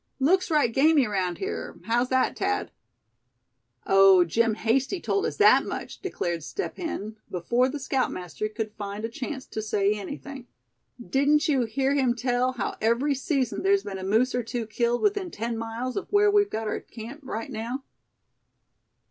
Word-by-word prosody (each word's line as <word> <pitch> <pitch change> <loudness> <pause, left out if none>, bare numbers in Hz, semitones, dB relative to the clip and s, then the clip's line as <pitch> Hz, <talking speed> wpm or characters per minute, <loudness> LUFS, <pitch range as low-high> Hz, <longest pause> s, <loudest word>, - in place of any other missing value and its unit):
"Looks 365 +8 +3
right 295 -8 +2
gamey 285 +1 +4
around 185 -4 -1
here; 390 - -5
how's 240 +2 +1
that, 260 0 +2
Thad?" 90 0 -1 1.1
"Oh! 195 -2 +7
Jim 225 +6 +1
Hasty 265 - 0
told 400 +3 0
us - - -5
that 415 - +6
much!" - - -6
declared 175 - -3
Step 400 - -5
Hen, 220 - -5
before 240 +9 +1
the 295 - -4
scoutmaster 215 - -2
could 215 0 -4
find 205 0 -5
a - - -3
chance 265 +3 -5
to 220 - -5
say 210 -1 +1
anything. 265 +4 -7 0.5
"Didn't 280 +5 +2
you 270 -5 +2
hear 265 +5 0
him 260 -4 +2
tell 250 +1 0
how 225 -6 -3
every 235 +6 +2
season 270 -2 -1
there's 390 0 +3
been 195 -1 -5
a - - -6
moose 220 +7 +2
or 245 - +1
two 235 0 -4
killed 235 +2 0
within 405 -3 +1
ten 230 -3 -3
miles 230 +3 -4
of - - -4
where 410 0 +5
we've 410 0 +3
got 220 0 -3
our - - -2
camp 235 +6 -10
right 230 0 -5
now. 240 +4 -4
245 Hz, 170 wpm, -26 LUFS, 215-280 Hz, 1.1 s, Oh